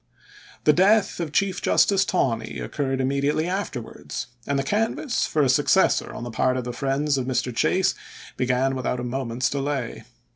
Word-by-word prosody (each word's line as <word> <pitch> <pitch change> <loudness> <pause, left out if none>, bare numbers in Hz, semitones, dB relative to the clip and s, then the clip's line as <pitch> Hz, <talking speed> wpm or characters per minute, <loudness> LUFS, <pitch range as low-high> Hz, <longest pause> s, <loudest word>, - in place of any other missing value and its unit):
The 150 - +5
death 195 +4 +3
of 165 -3 -3
Chief 190 +3 0
Justice 195 -1 +3
Taney 115 - -1
occurred 135 - -2
im 130 - +1
mediately 140 +3 0
afterwards, 125 - -4 0.2
and 140 - 0
the 135 - 0
canvass 225 - 0
for 150 - +1
a - - +3
suc 125 - +2
cessor - - +3
on - - -7
the 120 - -5
part 130 +3 +1
of 125 - -2
the 125 0 -5
friends 140 +2 0
of 125 - -3
Mr. 125 -1 -1
Chase 190 +9 +2 0.4
began 130 +1 +1
without 125 -1 -2
a - - -4
moment's 125 0 -2
delay. 140 -3 -3
135 Hz, 180 wpm, -24 LUFS, 125-160 Hz, 0.4 s, The